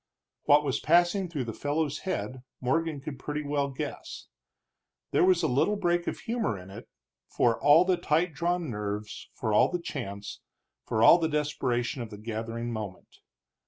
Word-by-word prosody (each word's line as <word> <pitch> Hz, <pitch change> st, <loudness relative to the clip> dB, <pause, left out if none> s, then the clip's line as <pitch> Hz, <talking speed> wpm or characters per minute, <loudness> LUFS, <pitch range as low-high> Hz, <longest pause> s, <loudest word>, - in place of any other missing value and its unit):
What 145 Hz, +1 st, +6 dB
was 135 Hz, -3 st, -1 dB
passing 175 Hz, +3 st, +3 dB
through 150 Hz, -6 st, -3 dB
the 115 Hz, -2 st, -5 dB
fellow's 145 Hz, +2 st, -1 dB
head 130 Hz, -9 st, -4 dB, 0.2 s
Morgan 150 Hz, +3 st, -1 dB
could 140 Hz, -2 st, -7 dB
pretty 150 Hz, +2 st, -4 dB
well 145 Hz, -1 st, -1 dB
guess. 135 Hz, -, -7 dB, 0.8 s
There -, -, +3 dB
was 180 Hz, -1 st, +4 dB
a -, -, +3 dB
little 145 Hz, +11 st, +2 dB
break 175 Hz, -3 st, 0 dB
of -, -, -3 dB
humor 230 Hz, -, -1 dB
in 90 Hz, +1 st, -11 dB
it, -, -, -11 dB, 0.4 s
for 115 Hz, -2 st, +1 dB
all 150 Hz, +5 st, +6 dB
the 185 Hz, -1 st, +2 dB
tight 165 Hz, +2 st, +1 dB
drawn 170 Hz, 0 st, -1 dB
nerves, 105 Hz, 0 st, -5 dB
for 110 Hz, -3 st, -2 dB
all -, -, +5 dB
the 180 Hz, -, -1 dB
chance, 105 Hz, -, -6 dB, 0.5 s
for 110 Hz, -, +1 dB
all 170 Hz, -, +8 dB
the 160 Hz, -1 st, 0 dB
desperation 140 Hz, -4 st, -1 dB
of 115 Hz, -, -6 dB
the 105 Hz, -, -9 dB
gathering 115 Hz, +2 st, -4 dB
moment. 105 Hz, -4 st, -7 dB
145 Hz, 170 wpm, -28 LUFS, 115-170 Hz, 0.8 s, all